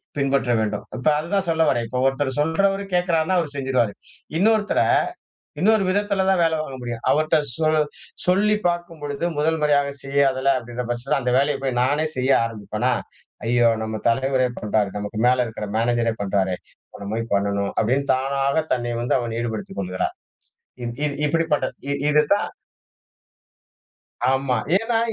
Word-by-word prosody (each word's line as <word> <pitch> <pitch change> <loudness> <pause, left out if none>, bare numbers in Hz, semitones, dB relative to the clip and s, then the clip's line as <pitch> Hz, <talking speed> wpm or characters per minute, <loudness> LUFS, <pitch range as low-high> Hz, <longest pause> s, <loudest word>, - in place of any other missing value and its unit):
பின்பற்ற 140 -3 +1
வேண்டும். 110 -1 -1
இப்ப 125 +4 -3
அத 165 +3 -6
தான் 190 -2 0
சொல்ல 160 0 +1
வர்றேன். 120 -3 +1
இப்ப 125 - -3
ஒருத்தர் 135 0 -1
சொல்றவரு 195 +6 +1
கேட்கிறாருன்னா 175 0 +2
அவர் 150 -4 -4
செஞ்சுருவாரு. 130 -6 +1 0.5
இன்னொருத்தர 215 +1 +3 0.8
இன்னொரு 215 +1 +4
விதத்துல 200 0 +1
தான் 190 -1 +3
வேலை 165 -1 +3
வாங்க 135 -4 -6
முடியும். 120 -2 -5
அவர்ட்ட 155 +1 +2 0.2
சொ 160 - -1 0.6
சொல்லி 205 +4 +3
பார்க்கும் 175 -2 -3
பொழுது 145 +3 -3
1 160 +2 +1
முறையா 150 -1 +4 0.2
செய்யாததுல 135 -1 +2
அப்படின்ற 120 0 -5
பட்சத்துல 125 +5 -1
அந்த 125 0 0
வேலைய 140 +1 +2
போய் 130 -2 -1
நானே 145 +5 +2
செய்ய 130 +1 +1
ஆரம்பிப்பனா? 115 +2 -2 0.5
ஐயயோ! 120 0 +4
நம்ம 110 -1 -4
தலைவரே 130 +2 +2
பண்றாரு. 105 -1 0
நமக்கு 105 +1 -4
மேல 125 0 +4
இருக்கிற 110 -2 -6
மேனேஜர் 115 -1 +1
பண்றாரே, 95 -2 0 0.3
இப்ப - - -14
நம்ம 100 +2 -4
போய் 115 -1 -4
பண்ணனும் 100 0 0
அப்டின்னு 130 +5 +1
தானாக 140 +3 0
தன்னை 120 -1 -2
வந்து 120 - +1
அவன் 115 -1 -3
ஈடுபடுத்திக் 110 -4 -4
கொள்கிறார். 90 0 -3 0.7
இத் 120 +2 -5
இத் 140 -1 -4
இப்டி 165 +2 +1
பட்டது 140 -3 0 0.2
இ 140 - +1 0.2
இதுதான் 150 +7 +3 1.8
ஆமா. 135 -2 +1 0.2
ஏன்னா 225 +2 +1
135 Hz, 155 wpm, -22 LUFS, 120-160 Hz, 1.8 s, இன்னொரு